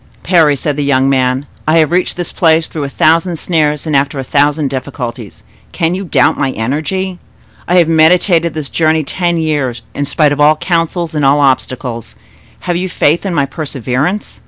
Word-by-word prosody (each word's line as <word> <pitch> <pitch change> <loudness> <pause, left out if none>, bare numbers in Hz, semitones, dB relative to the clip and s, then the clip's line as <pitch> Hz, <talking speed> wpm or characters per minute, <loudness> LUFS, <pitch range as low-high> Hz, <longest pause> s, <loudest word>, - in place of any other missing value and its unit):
"Parry," 165 -5 +3
said 145 +2 -3
the 145 - -1
young 135 -1 +2
man, 130 +1 0 0.2
"I 155 +2 +3
have 160 -1 +3
reached 180 0 0
this 175 - -3
place 160 -1 +2
through 150 -3 -5
a - - -5
thousand 165 +4 +2
snares 150 -3 0
and 155 -2 -1
after 140 +1 0
a 135 - -3
thousand 145 +1 +1
difficulties; 125 -5 -6 0.3
can 165 0 0
you 190 +2 -4
doubt 170 - +2
my 135 - +1
energy? 165 - -3 0.5
I 175 - +1
have 175 -3 +4
meditated 165 +1 +3
this 150 -4 -4
journey 160 -1 +1
ten 175 +3 -1
years, 145 -7 -2
in 145 0 -3
spite 150 0 +2
of 145 - -2
all 150 +1 +5
counsels 170 0 -2
and 150 -2 -1
all 140 +2 +4
obstacles—have 125 - -3
you 185 +1 -3
faith 170 +4 +1
in 180 - -2
my 140 - +2
perseverance? 140 - -3
150 Hz, 180 wpm, -13 LUFS, 140-170 Hz, 0.5 s, all